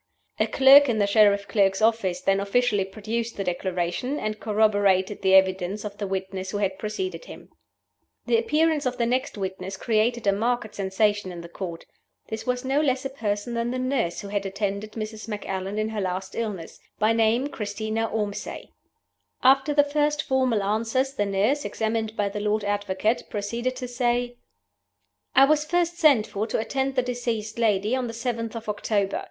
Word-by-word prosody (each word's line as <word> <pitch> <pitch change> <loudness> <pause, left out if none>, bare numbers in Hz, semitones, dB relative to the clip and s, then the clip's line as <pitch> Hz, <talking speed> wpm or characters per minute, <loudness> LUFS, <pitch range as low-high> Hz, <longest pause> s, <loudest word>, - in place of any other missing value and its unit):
A - - +3
clerk 275 +1 +7
in 230 - +1
the 205 - +3
Sheriff 200 -1 +4
Clerk's 195 -2 +2
office 220 -5 +1
then 195 0 +2
officially 205 0 +1
produced 225 +4 -4
the 200 - -1
Declaration, 180 +8 -2
and 215 -5 -3
corroborated 205 -2 +2
the 190 -1 +4
evidence 190 +2 +2
of 205 -1 -7
the 205 - -2
witness 190 0 -4
who 205 - -3
had 195 -2 -1
preceded 370 - -4
him. - - -12 0.8
The 460 - +3
appearance 320 - +1
of 255 - -3
the 235 - +1
next 255 0 -1
witness 190 0 -5
created 230 +2 +1
a 200 - +5
marked 225 +1 -1
sensation 205 0 0
in 175 -1 -7
the 170 - -9
Court. 170 -2 -7 0.4
This 220 +3 -5
was 250 +1 -1
no 275 +3 +2
less 265 -3 0
a 270 - -3
person 210 -3 -3
than 235 0 -1
the 255 - -2
nurse 255 -10 -1
who 200 - -8
had 200 0 -1
attended 200 +1 -3
Mrs. 215 0 -6
Macallan 195 -2 -4
in 215 0 0
her 220 -2 -3
last 185 0 -3
illness 205 -8 -5 0.2
by 215 +1 +3
name 230 +4 +2
Christina 220 0 -3
Ormsay. 210 -2 -4 0.7
After 270 +3 +5
the 290 0 +5
first 295 +1 0
formal 255 -6 +1
answers, 225 +6 0
the 205 -6 -1
nurse 210 +9 +1
(examined 220 0 -2
by 205 - +1
the 200 +1 -4
Lord 210 0 0
Advocate) 205 +2 -1
proceeded 235 +5 -3
to 255 -1 -5
say: 245 0 -1 1.0
"I 270 - +8
was 300 +1 +3
first 345 +2 0
sent 285 -10 +5
for 210 +1 -3
to - - -1
attend 265 +4 -1
the 255 - +2
deceased 235 -3 -3
lady 215 0 +2
on 255 -2 -2
the 230 - -6
7th 230 -1 -3
of 225 -1 -7
October. 205 -1 -1
220 Hz, 180 wpm, -25 LUFS, 200-250 Hz, 1.0 s, I